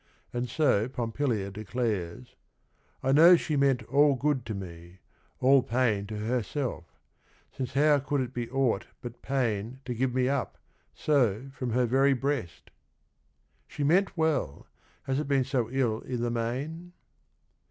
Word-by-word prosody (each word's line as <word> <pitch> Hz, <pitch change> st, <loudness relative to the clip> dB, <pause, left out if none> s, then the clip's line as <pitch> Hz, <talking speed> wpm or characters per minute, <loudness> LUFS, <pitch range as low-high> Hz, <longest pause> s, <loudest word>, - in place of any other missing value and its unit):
And 120 Hz, 0 st, -2 dB
so 125 Hz, -6 st, +2 dB
Pompilia 115 Hz, -4 st, -2 dB
declares: 100 Hz, -, -4 dB, 0.7 s
"I 135 Hz, -, +2 dB
know 165 Hz, +6 st, +8 dB
she 160 Hz, -2 st, -2 dB
meant 135 Hz, -4 st, +2 dB
all 140 Hz, +4 st, +3 dB
good 130 Hz, -2 st, -1 dB
to 110 Hz, -, -3 dB
me, 85 Hz, -2 st, -9 dB, 0.4 s
all 135 Hz, +1 st, +5 dB
pain 115 Hz, -5 st, 0 dB
To 105 Hz, 0 st, -5 dB
herself, 120 Hz, -, -2 dB, 0.4 s
— -, -, -35 dB
since 130 Hz, -1 st, -5 dB
how 145 Hz, +1 st, +4 dB
could 140 Hz, 0 st, -1 dB
it 125 Hz, 0 st, -4 dB
be 120 Hz, -1 st, -4 dB
aught 125 Hz, -5 st, 0 dB, 0.2 s
but 120 Hz, -1 st, -8 dB
pain 120 Hz, -2 st, -2 dB
To 125 Hz, -, -3 dB
give 125 Hz, +1 st, -1 dB
me 130 Hz, -1 st, +2 dB
up, 140 Hz, -1 st, -2 dB, 0.4 s
so, 130 Hz, -3 st, +1 dB
from 125 Hz, -2 st, -4 dB
her 125 Hz, +1 st, +2 dB
very 135 Hz, +3 st, +3 dB
breast? 135 Hz, -, -3 dB, 0.5 s
— -, -, -43 dB
She 145 Hz, -, -5 dB
meant 180 Hz, +6 st, +2 dB
well: 160 Hz, -, 0 dB, 0.4 s
has 135 Hz, +1 st, -1 dB
it 150 Hz, -, -3 dB
been 135 Hz, -2 st, +2 dB
so 125 Hz, -3 st, -1 dB
ill 120 Hz, -4 st, 0 dB
i' -, -, -1 dB
the 120 Hz, 0 st, -1 dB
main? 140 Hz, +10 st, -4 dB
125 Hz, 155 wpm, -28 LUFS, 115-140 Hz, 0.7 s, know